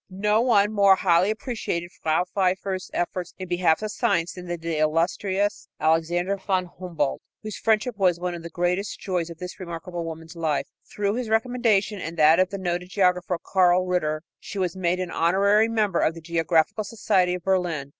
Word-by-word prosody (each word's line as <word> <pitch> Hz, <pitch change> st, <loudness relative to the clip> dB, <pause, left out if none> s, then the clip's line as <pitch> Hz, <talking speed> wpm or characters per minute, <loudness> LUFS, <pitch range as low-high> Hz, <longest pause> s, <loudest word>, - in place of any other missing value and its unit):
No 210 Hz, +3 st, +1 dB
one 210 Hz, -4 st, +3 dB
more 200 Hz, -2 st, +6 dB
highly 185 Hz, 0 st, +3 dB
appreciated 215 Hz, -6 st, -3 dB
Frau 160 Hz, +3 st, +1 dB
Pfeiffer's 190 Hz, 0 st, -1 dB
efforts 175 Hz, 0 st, -3 dB
in 185 Hz, -, -6 dB
behalf 175 Hz, +1 st, +2 dB
of 215 Hz, -, -2 dB
science 175 Hz, -9 st, 0 dB
than 180 Hz, -1 st, -9 dB
did 175 Hz, -1 st, -4 dB
the 165 Hz, -2 st, -2 dB
illustrious 185 Hz, +6 st, 0 dB
Alexander 175 Hz, +4 st, +1 dB
von 190 Hz, -1 st, -1 dB
Humboldt, 165 Hz, -6 st, -2 dB, 0.2 s
whose 215 Hz, -1 st, -5 dB
friendship 220 Hz, +1 st, +1 dB
was 180 Hz, -3 st, +3 dB
one 180 Hz, 0 st, -2 dB
of 170 Hz, -, -6 dB
the 170 Hz, -, -8 dB
greatest 180 Hz, +4 st, -1 dB
joys 180 Hz, -3 st, -2 dB
of 170 Hz, -, -9 dB
this 180 Hz, +4 st, -8 dB
remarkable 170 Hz, -1 st, -6 dB
woman's 165 Hz, +1 st, -8 dB
life. 160 Hz, -3 st, -1 dB, 0.3 s
Through 205 Hz, -1 st, -1 dB
his 245 Hz, -3 st, -3 dB
recommendation 220 Hz, -3 st, +1 dB
and 165 Hz, +2 st, -6 dB
that 155 Hz, +2 st, +6 dB
of 185 Hz, 0 st, +3 dB
the 200 Hz, -, -5 dB
noted 180 Hz, -1 st, -3 dB
geographer, 180 Hz, -2 st, +1 dB
Karl 185 Hz, -1 st, +3 dB
Ritter, 155 Hz, -4 st, -1 dB, 0.2 s
she -, -, -8 dB
was 185 Hz, -2 st, -1 dB
made 180 Hz, -1 st, 0 dB
an 180 Hz, -1 st, -3 dB
honorary 200 Hz, +6 st, +3 dB
member 210 Hz, -6 st, +1 dB
of 160 Hz, -, +1 dB
the 165 Hz, -, -9 dB
Geographical 165 Hz, +3 st, +1 dB
Society 185 Hz, -4 st, +1 dB
of 180 Hz, -, -8 dB
Berlin. 175 Hz, -7 st, 0 dB
180 Hz, 185 wpm, -24 LUFS, 170-200 Hz, 0.3 s, more